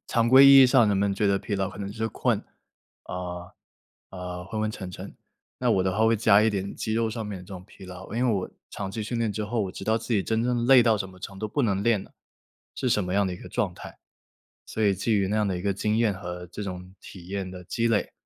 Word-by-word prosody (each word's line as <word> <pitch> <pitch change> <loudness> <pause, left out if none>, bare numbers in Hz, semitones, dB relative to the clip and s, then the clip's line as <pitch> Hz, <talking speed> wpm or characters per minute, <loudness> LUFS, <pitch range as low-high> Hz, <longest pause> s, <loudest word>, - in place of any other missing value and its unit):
常 115 -2 +1
规 135 +2 +8
意 135 -1 +10
义 - - +7
上 125 -4 +4
人 100 - +2
们 100 0 +1
觉 105 - 0
得 100 0 +2
疲 105 - -4
劳 95 -1 -1
可 100 - -11
能 100 -1 -5
就 - - -10
是 110 0 -1
困， - - -1 0.6
啊， 90 -1 -6 0.6
啊， 90 -1 -7
昏 110 +4 -6
昏 110 - 0
沉 95 -4 -7
沉， - - -9 0.4
那 - - +1
我 95 - +3
的 95 0 0
话 110 +2 +3
会 115 - +3
加 105 -1 +5
一 110 - +4
点 100 -2 -3
肌 110 - -3
肉 115 0 0
上 115 0 -5
面 105 -2 -5
的 90 - -12
这 - - -20
种 95 -3 -8
疲 95 -1 -15
劳。 90 +1 -10
因 125 +2 +1
为 120 - +2
我 95 - -3 0.2
长 100 -2 -5
期 110 +2 -4
训 115 +3 -3
练 115 -2 0
之 105 +1 -3
后， 115 +2 -2
我 95 - -5
知 95 - -8
道 110 +1 +2
自 115 +1 -3
己 100 - +2
真 110 +2 0
正 120 -1 0
累 130 -1 +7
到 115 -2 +3
什 95 - -3
么 95 0 -15
程 95 +1 -9
度， 110 - -3
不 125 +7 -2
能 100 -4 0
练 110 -3 +2
了， - - -17 0.6
是 130 - -2
什 105 -4 +1
么 90 - -4
样 100 0 +2
的 90 - -3
一 - - -8
个 - - -12
状 - - -2
态。 - - -11 0.7
所 110 - -3
以 100 -2 +3
基 100 +5 -1
于 100 -3 +2
那 105 - 0
样 105 -1 +1
的 95 -2 -2
一 - - -7
个 100 0 0
经 105 +3 0
验 110 -3 +2
和 90 -1 -7
这 90 +5 -8
种 90 -1 -7
体 90 -3 -12
验 95 -1 -4
的 90 -1 -10
积 115 +6 -1
累， 110 -3 0
100 Hz, 305 characters per minute, -26 LUFS, 95-110 Hz, 0.7 s, 意